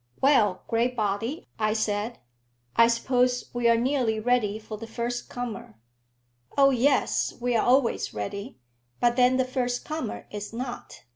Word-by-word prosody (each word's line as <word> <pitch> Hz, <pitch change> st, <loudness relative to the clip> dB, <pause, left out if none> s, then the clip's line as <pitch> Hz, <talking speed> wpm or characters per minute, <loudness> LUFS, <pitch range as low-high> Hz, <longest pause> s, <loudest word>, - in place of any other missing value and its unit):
"Well, 225 Hz, -9 st, +3 dB
Graybody," 230 Hz, -, -1 dB
I 215 Hz, -1 st, +2 dB
said, 215 Hz, +1 st, -1 dB, 0.6 s
"I 230 Hz, -, +7 dB
suppose 250 Hz, +1 st, +1 dB
we 240 Hz, -1 st, +2 dB
are 230 Hz, -, +5 dB
nearly 240 Hz, -3 st, +1 dB
ready 215 Hz, -3 st, +1 dB
for 215 Hz, 0 st, -8 dB
the 225 Hz, +2 st, -8 dB
first 240 Hz, +2 st, -4 dB
comer." 235 Hz, -, -6 dB, 0.8 s
"Oh 275 Hz, 0 st, +6 dB
yes; 265 Hz, +3 st, +2 dB
we're 240 Hz, -2 st, +1 dB
always 255 Hz, -1 st, +2 dB
ready; 200 Hz, +5 st, -5 dB, 0.4 s
but 240 Hz, 0 st, +3 dB
then 250 Hz, 0 st, +4 dB
the 260 Hz, -, +2 dB
first 250 Hz, -1 st, -2 dB
comer 310 Hz, -7 st, -4 dB
is 210 Hz, +1 st, -6 dB
not." 245 Hz, +1 st, -6 dB
240 Hz, 140 wpm, -26 LUFS, 220-250 Hz, 0.8 s, I